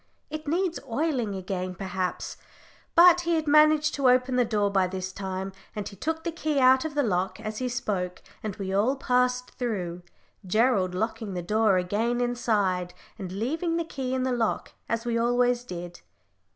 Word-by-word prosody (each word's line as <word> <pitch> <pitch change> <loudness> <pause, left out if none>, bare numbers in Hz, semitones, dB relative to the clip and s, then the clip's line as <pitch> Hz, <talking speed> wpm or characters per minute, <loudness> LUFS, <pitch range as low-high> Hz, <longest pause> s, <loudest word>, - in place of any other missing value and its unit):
"It 310 0 -6
needs 345 +2 0
oiling 245 -5 0
again, 185 -1 -4
perhaps;" 185 0 -3 0.6
but 350 +1 +8
he 340 -1 +1
had 315 -1 0
managed 305 0 +5
to 275 -3 +3
open 250 0 +3
the 250 - +4
door 210 -3 +1
by 190 -2 +3
this 185 0 -4
time, 190 0 -4 0.2
and 210 -2 -4
he 200 - -9
took 320 - -3
the 335 - -2
key 310 -3 -1
out 260 0 +6
of 310 -2 -4
the 290 - +2
lock 190 -4 -1
as 215 0 -5
he 255 -1 -1
spoke, 195 -7 -3 0.2
and 210 -3 -4
we 190 -1 -4
all 220 +8 +2
passed 250 -1 +1
through, 185 -8 -3 0.4
Gerald 195 -2 +2
locking 220 0 -3
the 175 - -3
door 210 +1 +3
again 215 +7 0
inside, 205 -7 0 0.2
and 185 -3 -5
leaving 315 - -1
the 335 - -1
key 260 -4 -3
in 260 - 0
the 260 - 0
lock, 230 -3 -1 0.2
as 230 +1 -1
we 230 -1 0
always 245 +1 +2
did. 175 -5 -8
230 Hz, 180 wpm, -27 LUFS, 190-260 Hz, 0.6 s, but